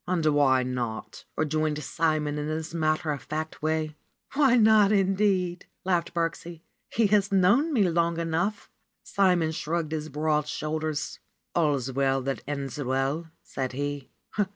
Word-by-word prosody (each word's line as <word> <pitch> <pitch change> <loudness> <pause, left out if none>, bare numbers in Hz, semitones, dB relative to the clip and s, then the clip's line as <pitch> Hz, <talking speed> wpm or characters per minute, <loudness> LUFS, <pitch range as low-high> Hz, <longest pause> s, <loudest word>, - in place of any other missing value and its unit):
^^And 165 -4 +2
why 135 -3 +4
not 120 -3 -4
?" - - -45
rejoined 155 -1 0
Simon 155 -2 0
in 150 - -3
his 160 +1 -4
matter 155 -1 0
of 145 - -4
fact 155 +1 -5
way. 155 0 -1 0.4
''Why 270 -4 +4
not, 215 -2 +6
indeed 190 -3 +1
!" - - -51
laughed 175 -3 0
Birksie. 170 0 -3 0.3
"He 225 - +2
has 205 -1 +3
known 205 - +4
me 215 -9 +3
long 170 0 +1
enough." 170 +5 -2 0.3
Simon 180 -5 +2
shrugged 160 0 -2
his 155 -1 -3
broad 150 0 0
shoulders. 155 0 -3 0.4
"AlFs 140 -6 +1
well 135 0 +2
that 135 +1 -2
ends 140 -2 -4
well," 135 +5 -1 0.2
said 130 -1 -4
he. 145 0 -4
155 Hz, 150 wpm, -27 LUFS, 145-175 Hz, 0.4 s, not